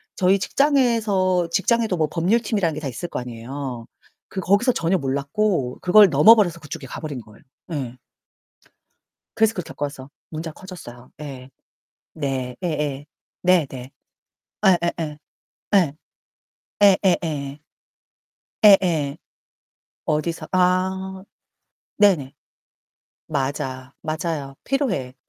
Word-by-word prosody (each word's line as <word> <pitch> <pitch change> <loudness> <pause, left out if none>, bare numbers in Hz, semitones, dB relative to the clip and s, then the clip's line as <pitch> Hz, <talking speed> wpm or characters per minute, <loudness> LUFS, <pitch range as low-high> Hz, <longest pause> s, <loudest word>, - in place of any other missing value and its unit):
저희 190 +1 +3
직장에서 215 - +2
직장에도 220 0 +1
뭐 155 -2 +2
법률팀이라는 195 -1 +1
게 155 - -4
다 145 - -4
있을 155 +8 -5
거 - - -3
아니에요. 125 +1 -6 0.4
그 190 - -5
거기서 205 +8 +3
전혀 170 +3 +1
몰랐고 140 +1 -1
그걸 195 +2 +7
넘어버려서 175 +3 +6
그쪽에 155 -1 -8
가버린 150 -2 -6
거예요, 110 -1 -18 0.3
예. 130 -5 -4 1.4
그래서 220 0 +3
그걸 180 - -4
겪어서 140 -3 -6 0.2
문제가 160 0 -6
커졌어요 130 -10 -11
예. 135 -3 -8 0.6
네 130 -4 -3
예예 150 -4 -2 0.4
.네 180 -4 +4
네. 130 0 -8 0.8
예 185 -2 +6
예 170 - +1
예. 150 -2 -4 0.6
예. 165 -6 +1 0.9
예 190 -2 +4
예예. 145 -2 -4 1.0
예예. 170 -8 +5 0.9
어디서 155 +2 -1
아 190 +1 +1 0.7
네네. 175 -10 +3 0.9
맞아, 135 -1 -3
맞아요. 155 -3 -3
필요해. 200 - -1
165 Hz, 230 characters per minute, -22 LUFS, 140-190 Hz, 1.4 s, 그걸